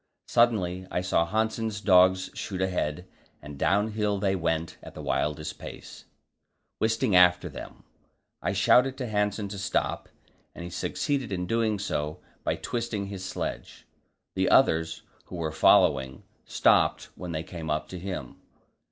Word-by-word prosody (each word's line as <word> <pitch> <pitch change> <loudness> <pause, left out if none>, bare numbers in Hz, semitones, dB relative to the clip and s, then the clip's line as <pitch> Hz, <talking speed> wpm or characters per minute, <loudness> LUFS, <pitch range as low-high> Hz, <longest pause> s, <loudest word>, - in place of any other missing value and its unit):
Suddenly 95 -6 +2
I 90 - -1
saw 85 -2 +1
Hanssen's 110 +1 -1
dogs 95 -2 +4
shoot 95 -3 -5
ahead, 90 -2 -1 0.3
and 75 0 -10
downhill 105 +5 +1
they 95 -1 +1
went 80 -2 -2
at - - -12
the - - -7
wildest 75 +1 -2
pace, - - -10 0.7
Wisting 110 -1 +1
after 90 0 +5
them. - - -10 0.6
I - - 0
shouted 130 +1 +4
to 130 - -3
Hanssen 105 -1 -1
to 100 0 -6
stop, 95 - -1 0.5
and 85 - -7
he 85 - -7
succeeded 135 +5 -2
in 90 -2 -2
doing 110 +1 +1
so 75 -6 -3 0.2
by - - 0
twisting 115 -4 -3
his 95 -2 -6
sledge. 95 - -5 0.5
The - - +1
others, 80 0 +3 0.2
who - - -9
were 80 -2 -2
following, 65 -3 +3 0.2
stopped - - +2
when 90 -2 -7
they 80 -1 -3
came 85 -2 -7
up 75 0 -1
to 90 - -7
him. 90 -8 -6
95 Hz, 145 wpm, -27 LUFS, 85-105 Hz, 0.7 s, after